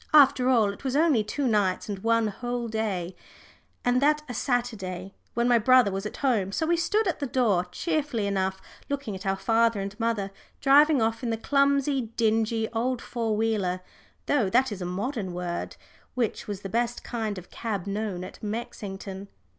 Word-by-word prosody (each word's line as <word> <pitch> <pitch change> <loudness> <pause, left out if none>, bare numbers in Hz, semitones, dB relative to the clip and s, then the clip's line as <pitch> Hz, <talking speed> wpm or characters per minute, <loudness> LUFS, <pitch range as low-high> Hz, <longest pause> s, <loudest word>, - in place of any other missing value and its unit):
After 265 -3 +6
all, 220 -6 +4
it - - -14
was 265 -1 -1
only 295 -7 +4
two 270 +7 -2
nights 205 -5 +1
and 200 -2 -4
one 230 +2 +2
whole 240 +3 -3
day, 200 -5 -2 0.7
and 245 +1 +3
that 300 +1 +3
a 245 - -5
Sunday, 200 -7 -2 0.2
when 235 +1 +2
my 240 -1 +5
brother 250 -2 +5
was 195 +2 -3
at - - -9
home, 210 -8 +2
so 320 - 0
we 340 +2 +3
stood 405 +6 +1
at 350 - -1
the 280 - -2
door 220 -8 +2
cheerfully 285 - -1
enough, 190 -1 -1 0.3
looking 280 -6 -3
at 190 +1 -6
our 195 - +2
father 230 +1 +2
and 195 0 -4
mother 225 -4 -1 0.3
driving 285 -1 +5
off 225 0 0
in 245 - -2
the 225 - 0
clumsy, 275 0 +2
dingy 225 0 +2
old 245 +2 0
four 230 -3 -2
wheeler 205 -5 0 0.4
though 245 -10 +2
that 250 +3 +3
is 195 -2 -5
a - - -2
modern 195 +1 -3
word 175 -1 -4 0.4
which 240 -4 -1
was 205 -2 -4
the 195 - -5
best 235 +3 -1
kind 220 -4 -3
of 180 - -10
cab 210 -6 -3
known 200 -2 -3
at - - -10
Mexington. 200 -3 -5
225 Hz, 185 wpm, -27 LUFS, 200-255 Hz, 0.7 s, After